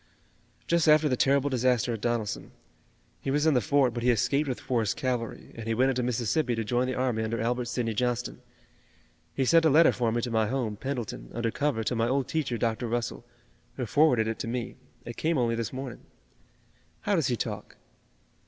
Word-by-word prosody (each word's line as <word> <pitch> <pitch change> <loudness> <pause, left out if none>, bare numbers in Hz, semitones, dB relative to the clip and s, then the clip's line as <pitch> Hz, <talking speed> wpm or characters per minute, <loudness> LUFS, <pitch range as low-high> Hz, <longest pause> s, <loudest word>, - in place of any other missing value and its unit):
"Just 170 -1 +2
after 155 0 +6
the 130 - +1
terrible 140 +2 +2
disaster 125 -1 +1
at 110 - -5
Donelson. 115 -3 -2 0.7
He - - -4
was 145 +3 +1
in 160 - +4
the 125 - +3
fort, 130 +2 +2
but 120 - -4
he 125 - +2
escaped 140 +5 +2
with 125 - -3
Forrest's 115 -5 0
cavalry, 125 -4 -3
and 115 -1 -8
he 115 - 0
went 130 +3 +3
into 130 -1 -1
Mississippi 120 +2 0
to 115 - -2
join 120 +4 0
the 130 - -2
army 125 -3 0
under 110 +1 -2
Albert 120 +2 -1
Sidney 120 -1 -2
Johnston. 125 +2 -2 0.9
He 135 - +1
sent 165 +4 +5
a 160 - +5
letter 155 +3 +6
for 120 -2 0
me 120 - 0
to 120 - -2
my 110 -1 +2
home, 115 -3 -2
Pendleton, 115 - -5
under 115 -1 -1
cover 140 -5 -1
to 120 - -1
my 115 0 +1
old 135 +1 0
teacher, 140 -7 -1
Dr. 115 +1 -1
Russell, 120 0 -3 0.5
who - - -3
forwarded 135 -8 +3
it 110 - -3
to - - -4
me. 120 0 -3 0.3
It 120 - -7
came 165 0 +1
only 120 -2 +1
this 115 -1 -2
morning." 130 -2 -7 0.9
"How - - 0
does - - +1
he - - +1
talk?" - - -5
125 Hz, 205 wpm, -28 LUFS, 115-135 Hz, 0.9 s, after